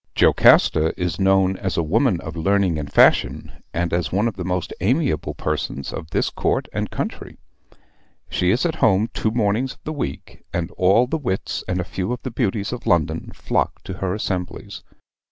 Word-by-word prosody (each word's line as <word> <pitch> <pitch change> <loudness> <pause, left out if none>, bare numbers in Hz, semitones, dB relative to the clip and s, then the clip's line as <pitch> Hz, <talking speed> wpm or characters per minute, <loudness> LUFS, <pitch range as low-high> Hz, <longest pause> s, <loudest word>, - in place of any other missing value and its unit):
"Jocasta 80 +1 +4
is 90 -1 -2
known 95 -1 +3
as 95 -1 -3
a 85 - +2
woman 100 - +2
of - - -7
learning 95 -1 +1
and 70 -2 -6
fashion, - - +3 0.2
and 85 0 -2
as 85 -5 0
one 100 +5 +2
of 115 - -3
the 95 - -5
most 90 0 -2
amiable 120 - 0
persons 75 -3 -3
of 80 - -6
this - - 0
court - - -1
and - - -2
country. - - -5 0.9
She 90 - 0
is 120 - +2
at 160 -2 -1
home 110 -1 +3
two 110 - 0
mornings 115 +3 0
of - - -27
the 155 - -4
week, 100 - -6
and 85 -1 -2
all 95 +7 +4
the 160 +6 -2
wits 100 -9 -3
and 90 0 -1
a - - 0
few 95 +3 -4
of 125 - -7
the 130 - -4
beauties 110 -2 -1
of 125 - -7
London 85 -4 +1
flock - - -1
to 95 - -6
her 95 0 -1
assemblies. 90 -5 -4
95 Hz, 190 wpm, -22 LUFS, 85-115 Hz, 0.9 s, Jocasta